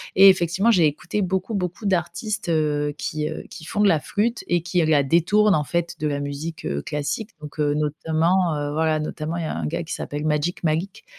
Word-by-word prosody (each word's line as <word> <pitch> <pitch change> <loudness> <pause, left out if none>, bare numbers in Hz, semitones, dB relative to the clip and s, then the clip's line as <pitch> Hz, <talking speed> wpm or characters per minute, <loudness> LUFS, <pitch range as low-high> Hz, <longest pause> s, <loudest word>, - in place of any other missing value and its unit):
et 195 +1 +9
effectivement, 185 +3 +2
j'ai 180 -8 +5
écouté 170 +7 -1
beaucoup, 190 +4 -1
beaucoup 185 +2 -3
d'artistes, 180 +2 -1
heu, 150 -2 +1
qui, 155 -1 -3
heu 155 - -6
qui 165 -2 -10
font 205 - -1
de 210 - +5
la 165 -5 +4
flûte 225 +8 -1
et 175 -1 +2
qui, 175 0 +1
heu, - - +2
la 155 -2 +4
détournent, 180 +8 +3
en 150 - +1
fait, 170 +3 -2
de 155 - -2
la 145 -1 -1
musique, 145 +3 -5
heu, 70 0 -2
classique. 150 +9 -3
Donc, 150 0 -10
heu, 145 -1 +2
notamment, 160 +3 +1
heu, 145 0 -2
voilà 155 0 +1
notamment, 155 +2 -4
il - - -2
y - - -3
a - - -3
un - - -3
gars 165 - -2
qui 165 - -5
s'appelle 145 +1 -5
Magic 155 +4 -1
Malik, 170 - -1
165 Hz, 225 wpm, -23 LUFS, 150-185 Hz, -, et